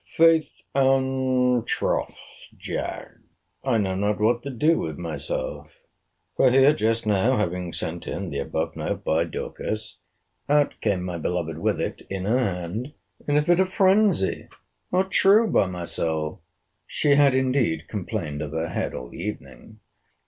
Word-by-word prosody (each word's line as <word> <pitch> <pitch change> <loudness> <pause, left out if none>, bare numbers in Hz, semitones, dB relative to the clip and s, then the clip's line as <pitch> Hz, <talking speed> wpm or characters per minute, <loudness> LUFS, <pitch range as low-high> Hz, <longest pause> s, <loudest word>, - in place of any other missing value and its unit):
Faith 165 -1 +3
and 130 -2 +2
troth, - - -1 0.4
Jack, - - -5 0.5
I 130 -4 +2
know 95 -3 0
not 100 +2 0
what 115 +3 +2
to 140 - -6
do 150 +6 +2
with - - -4
myself; - - -5 0.6
for 130 - +5
here, 135 +3 +6
just 115 0 0
now 105 +5 +2
having 90 -3 -2
sent 85 +1 -5
in 95 -4 -4
the 70 - -3
above 70 - -3
note - - -3
by 80 +2 +1
Dorcas, 110 +5 -5 0.5
out 145 0 +3
came 100 -4 0
my 90 -2 -4
beloved 80 -1 -2
with - - 0
it - - -3
in 95 -1 -4
her 115 +5 +2
hand, 100 - -3 0.3
in 145 0 +3
a 150 - +3
fit 175 +2 +4
of 190 - +3
phrensy!—true, 190 - +2
by 95 - +3
my 90 -1 -5
soul! 80 -2 -3 0.5
She 150 - 0
had 140 -2 +5
indeed 125 - +1
complained 80 -7 -4
of 75 -1 -5
her 80 0 -2
head - - -3
all 60 -1 -7
the - - -9
evening. 105 +2 -8
110 Hz, 150 wpm, -24 LUFS, 90-140 Hz, 0.6 s, here